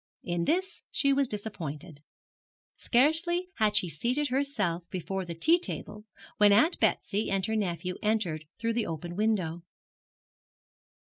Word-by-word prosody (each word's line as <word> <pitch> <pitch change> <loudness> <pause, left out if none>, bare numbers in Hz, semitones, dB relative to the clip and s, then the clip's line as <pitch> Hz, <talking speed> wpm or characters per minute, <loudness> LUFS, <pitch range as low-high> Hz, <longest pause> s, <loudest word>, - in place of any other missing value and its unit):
In 175 -1 -1
this 375 +4 -1
she 275 -1 +2
was 275 -1 +2
disappointed. 175 -8 -6 0.7
Scarcely 330 +8 +2
had 210 -1 +2
she 185 - +3
seated 250 - -1
herself 210 -11 -1
before 190 +1 -4
the 170 -1 -6
tea 330 - +5
table 210 -10 -1 0.3
when 205 -1 +6
Aunt 240 - +4
Betsy 210 +2 +1
and 195 -1 0
her 220 - -1
nephew 180 -3 -2
entered 195 -8 0
through 230 0 -1
the 230 -1 -1
open 170 +2 -5
window. 190 -6 0
210 Hz, 135 wpm, -29 LUFS, 175-255 Hz, 0.7 s, when